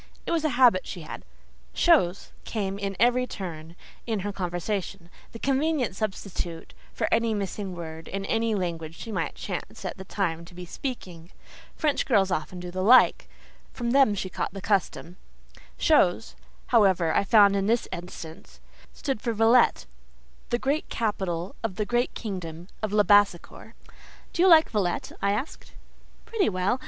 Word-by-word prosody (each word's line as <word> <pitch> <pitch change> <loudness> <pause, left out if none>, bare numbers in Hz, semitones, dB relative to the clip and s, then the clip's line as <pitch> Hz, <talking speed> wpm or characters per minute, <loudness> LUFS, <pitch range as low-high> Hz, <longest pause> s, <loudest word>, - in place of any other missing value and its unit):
It - - -3
was 330 -2 +1
a 310 - +2
habit 240 -8 +5
she 180 - -6
had: 155 - -8 0.5
"chose" 200 - +3
came 200 -3 -3
in 200 -1 -3
at - - -8
every 250 +1 +3
turn 165 -6 -7 0.3
in 220 -4 -1
her 205 +1 -4
conversation—the 180 +2 -5
convenient 275 -4 0
substitute 190 -5 -5 0.2
for - - -2
any 230 -1 +2
missing 200 -1 -4
word 160 -1 -8
in 195 0 -4
any 225 +1 0
language 165 -4 -4
she 225 - -7
might - - -2
chance - - -6
at - - -4
the 190 - -8
time 170 -4 -2
to 175 - -15
be 180 0 -8
speaking. 175 -6 -7 0.5
French 300 -3 0
girls 195 -6 +3
often 180 +1 -3
do 175 0 -7
the 185 +1 -3
like; 245 +7 +5 0.4
from 235 -1 -2
them 270 -6 +4
she 190 -1 -3
had - - -28
caught - - -3
the - - -4
custom. 190 -3 -1 0.6
"Chose," 225 - +2 0.4
however, 190 -7 +4
I - - +3
found 200 -1 +5
in 195 0 0
this 230 +2 +1
instance, 170 -2 -9 0.3
stood 270 -7 -3
for 235 - -1
Villette—the 65 - 0
great 280 +5 -1
capital 190 -5 -2
of 220 -5 -3
the 210 +1 -1
great 240 +3 0
kingdom 180 -5 -6
of 215 -2 -2
Labassecour. 205 -3 +2 0.6
"Do 345 - 0
you 375 - +6
like 320 -3 +7
Villette?" 195 -6 -1
I 200 - +2
asked. 220 +9 -5 0.5
"Pretty 440 -4 +1
well. 190 +6 0
200 Hz, 160 wpm, -26 LUFS, 175-230 Hz, 0.6 s, like